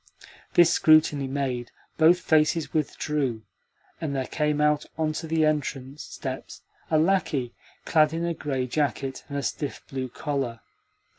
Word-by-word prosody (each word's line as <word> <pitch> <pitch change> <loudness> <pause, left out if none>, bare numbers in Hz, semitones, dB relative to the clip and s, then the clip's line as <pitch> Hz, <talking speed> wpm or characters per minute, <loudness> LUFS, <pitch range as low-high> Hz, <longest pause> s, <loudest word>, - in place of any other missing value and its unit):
This 175 -1 +7
scrutiny 155 -3 +4
made, 130 -3 -2 0.3
both 170 +3 +6
faces 155 0 +2
withdrew, 145 -6 -1 0.6
and 150 -4 -2
there 130 -1 -1
came 150 +1 0
out 150 0 +3
on 155 -1 0
to 165 +1 -5
the 160 0 +2
entrance 145 -2 -2
steps - - -7 0.3
a 155 - +3
lacquey 155 -7 +1 0.3
clad 155 -1 +4
in 165 +1 -2
a 170 - 0
grey 135 -5 -2
jacket 135 0 -2
and 140 - -3
a 140 - -2
stiff 145 0 -4
blue 130 -1 -4
collar. 135 -4 -3
150 Hz, 145 wpm, -26 LUFS, 135-155 Hz, 0.6 s, This